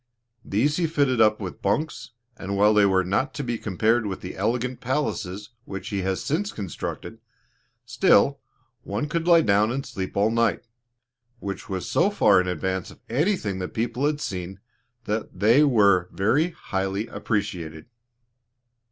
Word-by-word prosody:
These 130 +11 +1
he 170 -2 +1
fitted 140 -6 +1
up 110 -1 +4
with 95 -4 -7
bunks, 120 +5 -2 0.2
and 100 -2 -4
while 105 +2 +5
they 105 -1 +5
were 95 -1 +3
not 100 +10 -1
to 145 - -3
be 120 -3 -3
compared 110 +3 +1
with 95 -2 -5
the 90 - -7
elegant 120 +5 -1
palaces 110 -6 -3
which 95 -1 -6
he 100 -2 -2
has 95 0 -2
since 180 +8 -1
constructed, 100 -5 -6 0.7
still 140 +7 +3 0.4
one 105 +6 -3
could 165 +3 -2
lie 170 -1 +7
down 105 0 +3
and 135 +2 -3
sleep 95 0 -5
all 105 +2 +3
night, 115 -1 +1 0.7
which 100 0 -6
was 95 -2 -3
so 190 - +3
far 105 - +4
in 90 - -4
advance 95 +1 -2
of - - -15
anything 125 - 0
the 90 - -3
people 120 +6 -1
had 150 -1 -1
seen, 95 -6 -5 0.4
that 105 -3 -4
they 115 +9 +5
were 100 -10 +4
very 135 - +2
highly 95 - -3
appreciated. 85 -9 -3
105 Hz, 160 wpm, -24 LUFS, 95-130 Hz, 0.7 s, lie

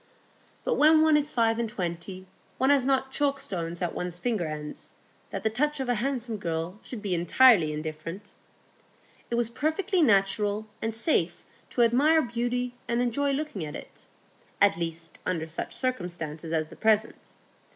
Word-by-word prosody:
But - - 0
when 310 +1 +6
one 315 -1 +5
is 300 0 +1
five 225 -1 +2
and 230 -1 -1
twenty, 185 -2 -5 0.3
one 265 +2 +3
has 270 -2 +3
not 265 -1 +1
chalk 280 0 +1
stones 175 -9 -4
at 175 - -1
one's 180 -1 -3
finger 210 -4 -1
ends 150 -1 -7 0.4
that - - -5
the 220 - +2
touch 295 +5 0
of 265 -2 -2
a - - +4
handsome 245 -4 -2
girl 170 +2 -3
should 225 -5 -8
be 195 -3 -1
entirely 175 0 +5
indifferent. 155 +6 -6 1.0
It 235 - -1
was 235 -1 +1
perfectly 320 - 0
natural 205 -3 +2 0.2
and 225 - -1
safe 220 - 0 0.3
to 240 - +2
admire 290 +7 +4
beauty 245 +1 -2
and 235 0 0
enjoy 250 +4 +1
looking 275 - -3
at 150 0 -6
it,—at 200 -4 -3
least 165 0 -5
under 165 -3 -1
such 160 +1 -5
circumstances 175 - -3
as 160 -1 0
the - - -12
present. 220 0 0
220 Hz, 160 wpm, -27 LUFS, 170-260 Hz, 1.0 s, when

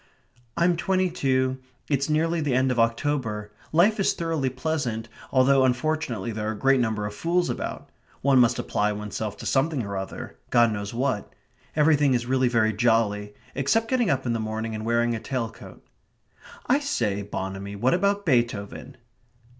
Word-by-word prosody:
("I'm 170 0 +3
twenty 185 0 +1
two. 130 -5 0 0.3
It's 140 0 0
nearly 165 +2 +1
the 145 -4 0
end 130 0 +2
of 125 - -1
October. 115 -3 0 0.2
Life 195 +7 +4
is 195 - +2
thoroughly 165 -5 -1
pleasant, 130 -5 -3 0.2
although 130 +1 +4
unfortunately 125 -4 0
there 110 0 -3
are - - -1
a - - -8
great 135 +4 +3
number 110 -3 0
of 105 - -4
fools 175 +8 0
about. - - -5 0.3
One 135 -1 +4
must 120 0 +4
apply 105 -3 0
oneself 105 0 -5
to - - -9
something 135 -1 +1
or 100 -1 -5
other 95 0 -6
God 120 -1 +4
knows 100 -1 -4
what. 125 -3 -2 0.4
Everything 150 -3 +4
is 120 0 -1
really 130 0 +2
very 110 -2 +2
jolly 105 -2 +1 0.2
except 220 +12 +1
getting 255 -4 +2
up 135 -1 0
in 120 - 0
the 115 - -1
morning 110 +1 -3
and 110 0 -5
wearing 120 0 +2
a 115 - -2
tail 120 -2 -3
coat.") - - -14 0.8
"I 270 +4 +3
say, 110 - -1
Bonamy, 100 0 -5
what 120 +6 +2
about 200 +3 +1
Beethoven?" 120 - -1
125 Hz, 170 wpm, -25 LUFS, 110-150 Hz, 0.8 s, Life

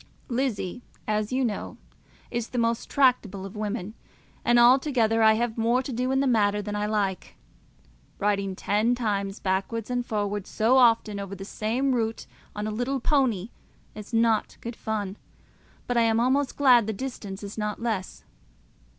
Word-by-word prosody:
Lizzie, 240 -4 -2 0.3
as 215 +1 -1
you 260 0 +1
know, 215 -4 -4 0.5
is 235 -1 -2
not - - -28
the - - -2
most 230 0 0
tractable 235 -8 +2
of 195 - -9
women, 210 -1 -4 0.5
and 240 0 +4
altogether 240 -2 +4
I 220 0 +7
have 230 0 -1
more 235 +3 +2
to 260 - -5
do 250 +2 -1
in 265 0 +2
the - - +1
matter 210 -5 +2
than 210 0 -4
I 210 0 -1
like. 200 -4 -2 0.8
Riding 200 -1 0
ten 215 +6 +1
miles 200 -3 -1
backwards 200 +5 -2
and 245 0 0
forwards 205 -3 -3
so 230 +4 +3
often 230 -4 +4
over 200 0 -6
the 195 0 -8
same 240 +7 -1
route 225 -2 -1 0.3
on 210 0 -3
a 215 - -2
little 245 +5 -1
pony 240 -7 +1 0.4
is 210 +1 -10
not 225 -1 +1
good 235 0 -6
fun, 210 -3 -3 0.7
but 245 - -1
I - - +5
am 225 0 +3
almost 260 +3 +1
glad 250 -6 +5
the 220 - -1
distance 205 -4 -6
is 200 0 -7
not 210 -1 -3
less. 220 -5 -3
225 Hz, 170 wpm, -26 LUFS, 205-245 Hz, 0.8 s, I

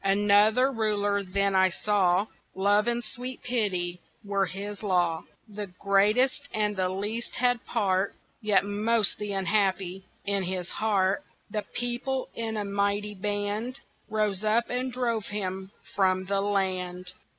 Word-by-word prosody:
Another 205 +6 +4
Ruler 205 -3 +1
then 200 +1 0
I 190 0 +5
saw 190 0 +2 0.3
Love 205 +3 +3
and 240 0 0
sweet 250 +3 -7
Pity 185 -7 -1 0.2
were 200 -1 +1
his 200 +3 -6
law: 175 -5 +1 0.2
The 205 -1 -6
greatest 215 +8 +3
and 210 -1 +1
the 185 -1 0
least 210 +5 -3
had 245 -1 +2
part 195 -4 +1 0.3
(Yet 210 -2 +3
most 210 +1 +1
the 210 -1 -3
unhappy) 190 -1 0 0.2
in 200 -1 +1
his 185 -1 -3
heart 200 +2 +1 0.3
The 210 - -1
People, 245 +2 -2
in 225 -1 -3
a 205 - -2
mighty 200 +1 0
band, 205 +5 -2 0.3
Rose 210 -2 0
up, 220 +2 +2
and 255 +1 -1
drove 235 -4 -1
him 190 -2 -4 0.3
from 185 -1 +2
the 195 +1 0
land! 185 -3 -1
205 Hz, 140 wpm, -28 LUFS, 190-220 Hz, 0.3 s, I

